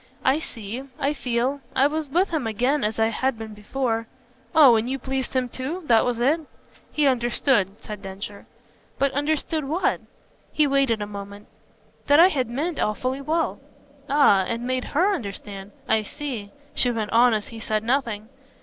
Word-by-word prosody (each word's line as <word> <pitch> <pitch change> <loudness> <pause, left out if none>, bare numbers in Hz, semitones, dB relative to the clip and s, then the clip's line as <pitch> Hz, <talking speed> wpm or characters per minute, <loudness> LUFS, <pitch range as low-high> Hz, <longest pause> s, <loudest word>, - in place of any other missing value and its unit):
"I 265 +4 +4
see. 230 -4 -7 0.2
I 285 0 0
feel. 255 +1 -1
I 265 +1 +4
was 305 0 -1
with 360 +7 +2
him 300 -8 -1
again 250 +7 +1
as 215 +1 -1
I 225 0 +3
had 260 +2 -1
been 220 -1 -7
before 225 +2 -2 0.2
" 255 +3 -30
"Oh 280 -7 +8
and 225 +2 0
you 270 - -1
pleased 265 0 -3
him 255 -1 +1
too? 275 +9 -5
That 230 -5 +5
was 245 -2 0
it?" 290 +7 +2 0.5
"He 300 -1 +1
understood," 240 -4 +2
said 210 -2 -7
Densher. 200 +1 -8 0.5
"But 275 0 +2
understood 300 +2 -1
what?" 325 +7 0 0.5
He 305 - +3
waited 275 -6 +2
a - - -3
moment. 200 0 -9 0.6
"That 290 +1 +6
I 355 +3 +8
had 260 -9 -1
meant 300 +7 -2
awfully 255 +6 -1
well." 320 +3 -1 0.5
"Ah, 275 -9 +5
and 235 +1 -3
made 255 0 -1
HER 365 +7 +2
understand? 200 - -6 0.2
I 220 0 +3
see," 245 -3 -6 0.2
she 250 - +3
went 220 -3 -2
on 235 0 +5
as 210 - -4
he 225 - -9
said 215 -1 -1
nothing. 230 -4 -1
255 Hz, 175 wpm, -24 LUFS, 220-285 Hz, 0.6 s, Oh